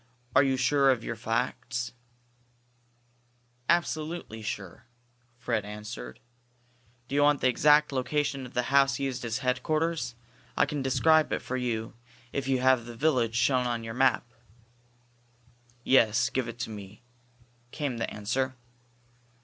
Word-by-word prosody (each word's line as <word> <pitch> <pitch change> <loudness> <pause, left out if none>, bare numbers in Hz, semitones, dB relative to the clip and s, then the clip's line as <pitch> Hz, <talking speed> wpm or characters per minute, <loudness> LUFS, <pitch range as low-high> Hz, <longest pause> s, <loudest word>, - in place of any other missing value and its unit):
"Are 130 - +8
you 135 -2 +1
sure 135 +2 +3
of 125 -3 +2
your - - -4
facts?" 120 +1 -2 1.8
"Absolutely 160 -7 -1
sure," 105 0 -6 0.5
Fred 120 -4 -1
answered. 105 +3 -8 0.9
"Do - - -8
you 145 - +3
want 145 -1 +4
the - - +4
exact 150 +4 +4
location 135 0 -1
of - - -17
the 125 - +1
house 135 0 +4
used 135 -3 -3
as 115 0 -2
headquarters? 145 0 0 0.4
I - - +5
can 145 0 -3
describe 150 +4 +3
it - - -2
for 130 - -4
you 115 -3 -2 0.4
if 135 -1 -2
you 130 -2 +1
have 130 -2 +3
the 120 0 -9
village 120 -4 +1
shown 125 +1 +2
on 120 -1 -2
your 115 0 -6
map." 130 0 +2 1.6
"Yes. 120 -1 +4
Give 130 -2 -1
it 115 0 -7
to 115 - -4
me," 105 +1 -10 0.7
came 140 -3 -3
the 115 - -2
answer. 130 +6 -2
130 Hz, 140 wpm, -28 LUFS, 115-140 Hz, 1.8 s, Are